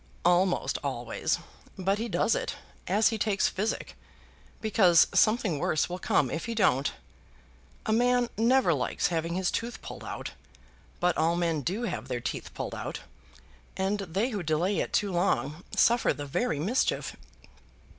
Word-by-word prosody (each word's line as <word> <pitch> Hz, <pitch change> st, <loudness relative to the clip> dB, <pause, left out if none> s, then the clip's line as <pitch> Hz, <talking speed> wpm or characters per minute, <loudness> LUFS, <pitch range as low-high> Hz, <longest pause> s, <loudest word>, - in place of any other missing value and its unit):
"Almost 180 Hz, +1 st, +2 dB
always; -, -, -1 dB, 0.4 s
but 195 Hz, +2 st, 0 dB
he 230 Hz, +1 st, -3 dB
does -, -, +2 dB
it, -, -, -2 dB, 0.3 s
as 210 Hz, +4 st, +4 dB
he 225 Hz, -1 st, -3 dB
takes 205 Hz, -2 st, +2 dB
physic, 215 Hz, +4 st, -3 dB, 0.6 s
because 190 Hz, -6 st, +5 dB
something 215 Hz, -8 st, +3 dB
worse 155 Hz, -, +1 dB
will 180 Hz, +1 st, -4 dB
come 135 Hz, -6 st, +1 dB
if 165 Hz, -, -3 dB
he 230 Hz, -1 st, -3 dB
don't. 140 Hz, -, +2 dB, 0.9 s
A -, -, 0 dB
man 245 Hz, +1 st, +3 dB
never 230 Hz, -4 st, +3 dB
likes 130 Hz, +3 st, 0 dB
having 165 Hz, 0 st, -1 dB
his 185 Hz, -1 st, 0 dB
tooth 235 Hz, +1 st, -3 dB
pulled -, -, -8 dB
out, -, -, -6 dB, 0.7 s
but 180 Hz, -1 st, +2 dB
all 165 Hz, +2 st, +2 dB
men 165 Hz, -3 st, 0 dB
do 195 Hz, -, -2 dB
have 120 Hz, -, -3 dB
their 125 Hz, -2 st, -2 dB
teeth -, -, -5 dB
pulled -, -, -4 dB
out, -, -, -5 dB, 0.8 s
and 195 Hz, +2 st, 0 dB
they 195 Hz, +6 st, -1 dB
who 205 Hz, -4 st, -2 dB
delay 170 Hz, +5 st, 0 dB
it -, -, -2 dB
too 205 Hz, -2 st, +1 dB
long 170 Hz, -3 st, 0 dB
suffer 235 Hz, 0 st, +4 dB
the 145 Hz, -, -6 dB
very 150 Hz, -, -1 dB
mischief." 215 Hz, -, 0 dB
190 Hz, 155 wpm, -28 LUFS, 165-220 Hz, 0.9 s, because